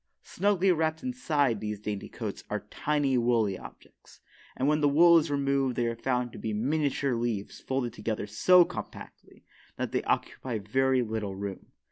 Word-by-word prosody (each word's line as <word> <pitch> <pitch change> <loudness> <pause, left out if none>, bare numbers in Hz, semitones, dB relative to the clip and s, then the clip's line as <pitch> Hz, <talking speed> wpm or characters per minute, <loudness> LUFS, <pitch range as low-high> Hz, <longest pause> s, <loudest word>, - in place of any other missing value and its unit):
Snugly 195 0 +2
wrapped 160 -1 0
inside 150 - 0
these 105 -1 -4
dainty 105 -1 -5
coats - - -6
are - - -3
tiny 145 -4 +1
woolly 115 -5 +2
objects, - - -14 0.4
and 130 - 0
when 150 +1 +2
the 145 - +4
wool 170 +3 +7
is 160 0 -3
removed 140 -2 0
they 120 - 0
are 115 0 -1
found 125 0 -1
to - - -10
be 110 - -3
miniature 140 +3 0
leaves 115 -4 -3
folded 130 -3 -2
together 110 -2 -3
so 175 - +5
compactly - - -10 0.3
that - - -3
they - - 0
occupy 125 -4 -2
very 130 +5 +1
little 110 -3 -4
room. 100 -1 -6
130 Hz, 165 wpm, -28 LUFS, 110-150 Hz, 0.4 s, wool